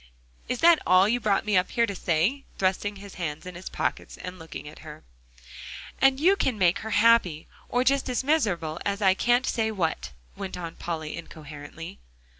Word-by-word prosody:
Is 250 - -2
that 335 -1 +7
all 185 +2 +5
you 240 +3 +1
brought 205 -4 +1
me 210 -2 +1
up 180 0 +3
here 235 - +2
to 200 - -4
say?" 185 - 0
thrusting 195 +2 0
his 200 0 -11
hands 155 0 -4
in 180 - -7
his 175 +2 -8
pockets - - -3
and 185 0 -8
looking 160 -2 -9
at 150 - -11
her. 155 -1 -11 1.0
"And 270 0 +4
you 365 +6 +5
can 260 - 0
make 180 -3 +3
her 220 - -6
happy, 210 -7 +3 0.2
or 245 +1 +1
just 275 +1 +1
as 250 +1 -1
miserable 195 - 0
as 200 +1 -2
I 190 -1 +6
can't 245 +5 +2
say 220 -1 0
what," 180 -7 -2 0.2
went 190 -2 -6
on 170 -2 -6
Polly 160 -3 -5
incoherently. 155 - -10
195 Hz, 190 wpm, -26 LUFS, 170-235 Hz, 1.0 s, that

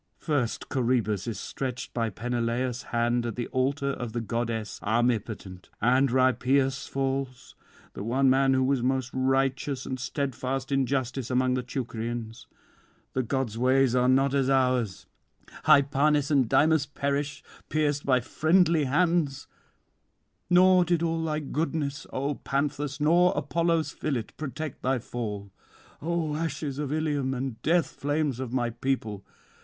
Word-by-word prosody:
First 140 -7 -1
Coroebus 120 -6 0
is 110 -4 -3
stretched 130 +2 -5
by 115 -2 0
Peneleus' 120 +3 -2
hand 120 +1 0
at 115 - -4
the 120 - -2
altar 140 +2 0
of 120 -4 -5
the 120 - -1
goddess 115 -1 -3
armipotent; 110 -4 -1
and 130 +4 +3
Rhipeus 130 +1 +2
falls, 135 -1 -3 0.4
the - - -7
one 130 +5 +2
man 135 0 +4
who 130 - +2
was 135 -1 +1
most 130 0 0
righteous 135 +1 0
and 130 - -4
steadfast 135 0 -3
in 135 -2 +2
justice 130 -2 -2
among 130 0 +2
the 130 - 0
Teucrians: 120 -2 -5 0.7
the 130 - +1
gods' 125 -3 -2
ways 130 0 +3
are 125 0 +3
not 135 +1 +3
as 135 -2 +2
ours: 125 -7 +1 0.6
Hypanis 140 +1 +4
and 135 -6 +3
Dymas 155 -2 +3
perish, 140 0 -2 0.3
pierced 145 -2 0
by 130 -2 +3
friendly 160 +3 +3
hands; 160 -1 +1 1.0
nor 185 0 +6
did 175 -1 +1
all 165 -1 0
thy 155 -1 -1
goodness, 145 -1 -3
O 140 +3 -1
Panthus, 140 0 -2
nor 170 +4 +4
Apollo's 165 +2 0
fillet 135 -7 -2
protect 155 -1 -5
thy 130 +1 +1
fall. 105 -4 -5 0.5
O 160 -2 -1
ashes 150 -3 -3
of 145 -2 -3
Ilium 145 -4 0
and 125 -3 -4
death 170 +3 +2
flames 145 -3 -1
of 130 -3 -4
my 120 -2 0
people! 110 -5 -2
135 Hz, 140 wpm, -27 LUFS, 125-145 Hz, 1.0 s, nor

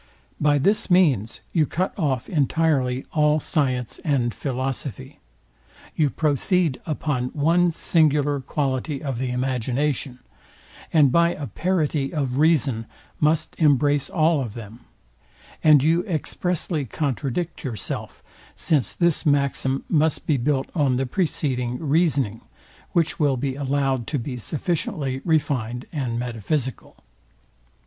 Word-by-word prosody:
By 145 0 +3
this 200 +11 +1
means 145 - +3
you 155 -4 +3
cut 185 +4 -1
off 135 - -1
entirely 140 -4 +1
all 150 0 +3
science 130 -7 -1
and 130 -6 +1
philosophy: 130 - -4 0.8
You 150 -3 +2
proceed 155 +1 +1
upon 145 -5 -1
one 170 +4 +3
singular 150 -3 +2
quality 135 +1 -2
of 135 -5 -3
the 130 -1 -2
imagination, 130 +1 -1 0.7
and 150 -5 +5
by 170 +3 +3
a 145 - -5
parity 150 - -1
of 140 -4 -1
reason 140 -8 +2 0.3
must 155 +1 +1
embrace 145 -2 +3
all 160 -3 +2
of 115 -5 -5
them: 115 0 -9 0.8
And 150 -3 +6
you 165 +3 +3
expressly 170 -1 -2
contradict 145 +5 -3
yourself; 115 -7 -5 0.3
since 140 -10 0
this 170 -2 +1
maxim 140 -2 +1
must 160 -1 +1
be 150 - +2
built 135 +2 -1
on 140 -6 +2
the 135 +2 0
preceding 125 -5 -1
reasoning, 140 - +1 0.5
which 165 -3 +1
will 145 -4 +2
be 135 +1 -2
allowed 135 -3 -1
to 150 - -1
be 125 0 -4
sufficiently 145 - -2
refined 130 -7 0
and 130 -6 -2
metaphysical. 120 - -4
145 Hz, 120 wpm, -23 LUFS, 130-155 Hz, 0.8 s, And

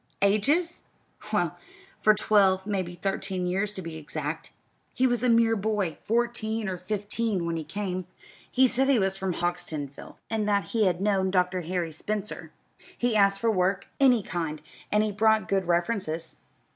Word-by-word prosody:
"Ages? 285 - +2 0.5
Well, - - 0 0.4
for 215 0 +5
twelve 195 -3 +3
maybe 185 -4 -2
thirteen 185 0 -2
years, 195 +3 0
to 190 - -6
be 165 -1 -6
exact. 155 0 -5 0.4
He 260 - +2
was 245 -3 +2
a 250 - +2
mere 230 -1 +4
boy, 200 -5 -1
fourteen 225 -1 -1
or 185 -2 -3
fifteen, 205 0 -2
when 170 0 -1
he 160 - -3
came. 185 +2 -4 0.4
He 260 +1 +5
said 260 +2 +2
he 275 - +5
was 195 -2 +1
from 190 -2 -2
Houghtonsville, 165 -5 -4
and 220 -2 -1
that 200 -1 +1
he 220 -3 +2
had 180 0 0
known 195 -2 +2
Dr. 180 -1 +1
Harry 175 -1 -2
Spencer. 210 +6 -5 0.5
He 240 -2 +1
asked 200 -1 +4
for 230 +2 +2
work 190 0 0
any 250 -6 +5
kind, 160 -4 -4 0.3
and 210 -1 +2
brought 220 -2 +3
good 190 -1 0
references. 170 -2 -1
195 Hz, 160 wpm, -27 LUFS, 180-220 Hz, 0.5 s, for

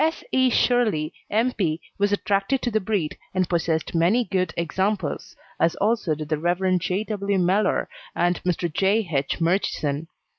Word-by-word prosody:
S. 320 +1 0
E. 260 -1 +4
Shirley, 220 -11 +2 0.2
M. 230 +4 +2
P., 165 -8 -1 0.2
was 205 0 +2
attracted 205 +5 0
to 240 - 0
the 220 - +2
breed, 190 -6 -1 0.2
and 185 -1 +2
possessed 165 -2 0
many 175 +9 +3
good 185 -3 0
examples, 190 +2 -2 0.2
as 165 +1 +2
also 210 -6 +1
did 155 0 -7
the 155 -2 0
Rev. 180 +2 +1
J. 180 +4 -1
W. 200 -2 -1
Mellor 185 +4 +2 0.3
and 175 0 +1
Mr. 175 -2 -1
J. 200 +3 +2
H. 135 0 0
Murchison. 165 -4 0
185 Hz, 160 wpm, -24 LUFS, 165-210 Hz, 0.3 s, E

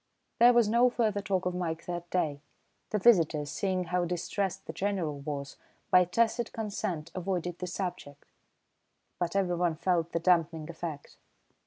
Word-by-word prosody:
There 240 +1 +8
was 235 -3 +4
no 235 +3 +4
further 220 -4 0
talk 190 -3 -1
of 180 - 0
Mike 170 -2 -3
that 175 -1 -5
day. 150 -6 -1 0.5
The 215 - 0
visitors, 165 -9 +4
seeing 185 -2 -1
how 180 +1 0
distressed 185 +2 -2
the - - -6
General 185 -8 -2
was, 140 -1 -5 0.3
by 180 0 +7
tacit 230 +6 +1
consent 200 -7 -3
avoided 180 -1 -3
the 180 - -4
subject, 175 -6 -5 0.9
but 175 +1 -1
everyone 175 -3 +1
felt 170 0 0
the 170 - 0
dampening 165 -3 +2
effect. 160 -3 -7
180 Hz, 150 wpm, -30 LUFS, 165-195 Hz, 0.9 s, There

